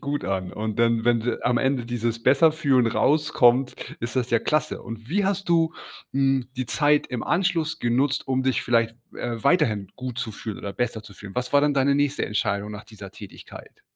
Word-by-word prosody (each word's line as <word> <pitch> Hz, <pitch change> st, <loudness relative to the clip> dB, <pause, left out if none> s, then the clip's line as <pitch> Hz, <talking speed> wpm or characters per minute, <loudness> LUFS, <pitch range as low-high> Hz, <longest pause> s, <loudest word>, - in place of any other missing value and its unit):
gut 145 Hz, 0 st, -3 dB
an. 95 Hz, -1 st, -2 dB
Und 110 Hz, +1 st, -4 dB
dann, 115 Hz, -1 st, +2 dB
wenn 120 Hz, 0 st, +1 dB
am 120 Hz, 0 st, +2 dB
Ende 130 Hz, -2 st, 0 dB
dieses 115 Hz, -1 st, -2 dB
„besser 140 Hz, +6 st, +5 dB
fühlen“ 135 Hz, -6 st, +2 dB
rauskommt, 130 Hz, -1 st, +2 dB
ist 120 Hz, +3 st, -4 dB
das 125 Hz, -1 st, 0 dB
ja 115 Hz, -, +4 dB
klasse. 155 Hz, +3 st, -1 dB
Und 115 Hz, -1 st, -9 dB
wie 195 Hz, +6 st, +1 dB
hast 195 Hz, -1 st, -1 dB
du, 165 Hz, -1 st, +2 dB, 0.4 s
hm, 135 Hz, -2 st, +1 dB
die 130 Hz, -2 st, -2 dB
Zeit 145 Hz, +4 st, +2 dB
im 125 Hz, -2 st, -4 dB
Anschluss 170 Hz, -3 st, 0 dB
genutzt, 130 Hz, +4 st, 0 dB
um 130 Hz, 0 st, +1 dB
dich 130 Hz, -1 st, +1 dB
vielleicht, 115 Hz, -1 st, +1 dB, 0.2 s
äh, 120 Hz, -2 st, -4 dB
weiterhin 115 Hz, -, +2 dB
gut 130 Hz, -1 st, -6 dB
zu 125 Hz, -3 st, -3 dB
fühlen 105 Hz, 0 st, -7 dB
oder 100 Hz, -, -6 dB
besser 115 Hz, -2 st, -2 dB
zu 105 Hz, -2 st, -14 dB
fühlen? 100 Hz, 0 st, -11 dB
Was 125 Hz, +2 st, -3 dB
war 145 Hz, -, +6 dB
denn 145 Hz, -1 st, +2 dB
deine 140 Hz, +1 st, +3 dB
nächste 145 Hz, 0 st, 0 dB
Entscheidung 105 Hz, 0 st, -1 dB
nach 105 Hz, +1 st, -8 dB
dieser 105 Hz, -3 st, -11 dB
Tätigkeit? -, -, -12 dB
125 Hz, 200 wpm, -24 LUFS, 115-145 Hz, 0.4 s, war